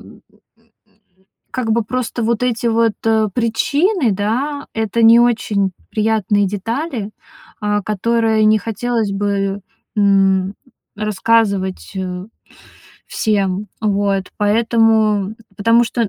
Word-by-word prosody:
м, -, -, -16 dB, 1.0 s
м, 190 Hz, -, -32 dB, 0.3 s
как 250 Hz, -3 st, -2 dB
бы 230 Hz, 0 st, +1 dB
просто 245 Hz, +1 st, -3 dB
вот 230 Hz, +1 st, 0 dB
эти 240 Hz, -1 st, 0 dB
вот, 230 Hz, -1 st, +2 dB
э, 220 Hz, -1 st, +3 dB
причины, 285 Hz, -, +1 dB
да, 255 Hz, +9 st, -2 dB
это 225 Hz, +1 st, -1 dB
не 230 Hz, +1 st, +7 dB
очень 215 Hz, -5 st, +1 dB, 0.2 s
приятные 210 Hz, -2 st, +1 dB
детали, 225 Hz, -, -4 dB, 0.5 s
а, 210 Hz, 0 st, 0 dB
которые 220 Hz, +2 st, +1 dB
не 215 Hz, 0 st, +5 dB
хотелось 225 Hz, -1 st, -2 dB
бы, 195 Hz, 0 st, -1 dB, 0.4 s
м, 195 Hz, -1 st, +3 dB, 0.4 s
рассказывать, 205 Hz, -2 st, 0 dB
э, 185 Hz, 0 st, -4 dB, 0.8 s
всем. 200 Hz, -2 st, -1 dB
Вот, 200 Hz, -2 st, 0 dB
поэтому 220 Hz, -1 st, +2 dB, 0.2 s
потому 230 Hz, +3 st, +4 dB
что, 230 Hz, -1 st, -1 dB
215 Hz, 110 wpm, -18 LUFS, 200-230 Hz, 1.0 s, не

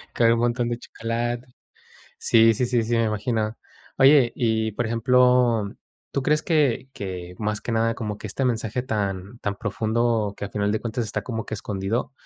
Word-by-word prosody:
con 115 Hz, -1 st, +4 dB
un 115 Hz, -, 0 dB
montón 120 Hz, 0 st, +1 dB
de 120 Hz, 0 st, -3 dB
chocolate". 120 Hz, +1 st, -3 dB, 0.7 s
Sí, 115 Hz, 0 st, +5 dB
sí, 125 Hz, +3 st, 0 dB
sí, 120 Hz, -1 st, +1 dB
sí, 115 Hz, +1 st, 0 dB
me 115 Hz, -, +3 dB
imagino. 110 Hz, 0 st, -1 dB, 0.4 s
Oye, 135 Hz, -2 st, +6 dB
y 110 Hz, -2 st, +1 dB
por 120 Hz, +3 st, -2 dB
ejemplo, 120 Hz, -2 st, +3 dB, 0.4 s
¿tú 140 Hz, -, -1 dB
crees 150 Hz, +3 st, +2 dB
que 145 Hz, -6 st, +1 dB
que, 90 Hz, -4 st, -6 dB
más 105 Hz, -1 st, -2 dB
que 120 Hz, -, -4 dB
nada, 115 Hz, 0 st, +1 dB
como 105 Hz, -3 st, -4 dB
que 110 Hz, -, -7 dB
este 130 Hz, +7 st, -2 dB
mensaje 115 Hz, -1 st, -1 dB
tan 100 Hz, -2 st, -3 dB
tan 100 Hz, 0 st, -2 dB
profundo 110 Hz, 0 st, 0 dB
que -, -, -5 dB
a 100 Hz, -, -6 dB
final 105 Hz, 0 st, 0 dB
de 110 Hz, -, 0 dB
cuentas 115 Hz, +1 st, -2 dB
está 105 Hz, 0 st, -3 dB
como 115 Hz, -1 st, -4 dB
que -, -, -4 dB
escondido, 105 Hz, +5 st, -3 dB
115 Hz, 185 wpm, -24 LUFS, 105-120 Hz, 0.7 s, Oye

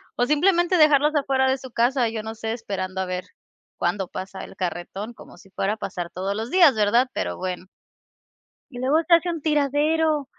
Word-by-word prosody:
o, 245 Hz, -, +1 dB
simplemente, 345 Hz, +5 st, +3 dB
dejarlos 300 Hz, -1 st, +5 dB
afuera 265 Hz, -2 st, +2 dB
de 265 Hz, -, +1 dB
su 260 Hz, -2 st, -11 dB
casa, 240 Hz, 0 st, +2 dB
yo 220 Hz, -1 st, -5 dB
no 220 Hz, +1 st, -5 dB
sé, 225 Hz, 0 st, -3 dB
esperando 190 Hz, -5 st, -4 dB
a 190 Hz, -, -1 dB
ver 180 Hz, 0 st, -4 dB, 0.5 s
cuándo 185 Hz, +2 st, -1 dB
pasa 190 Hz, +2 st, -7 dB
el -, -, -11 dB
carretón, 190 Hz, +4 st, -5 dB
como -, -, -15 dB
si 195 Hz, -, -18 dB
fuera 195 Hz, +2 st, -1 dB
a 220 Hz, -, -7 dB
pasar 175 Hz, -4 st, -5 dB
todos 190 Hz, +2 st, -3 dB
los 225 Hz, +3 st, -4 dB
días, 340 Hz, -8 st, +6 dB
¿verdad? 220 Hz, +4 st, +3 dB
Pero, 90 Hz, -1 st, -3 dB
bueno. 185 Hz, 0 st, -4 dB, 1.1 s
Y 245 Hz, -, -9 dB
luego 275 Hz, +5 st, +2 dB
se 350 Hz, -, +4 dB
hace 335 Hz, +1 st, +4 dB
un 335 Hz, -2 st, -3 dB
tiradero. 300 Hz, +1 st, +1 dB
240 Hz, 195 wpm, -23 LUFS, 195-295 Hz, 1.1 s, días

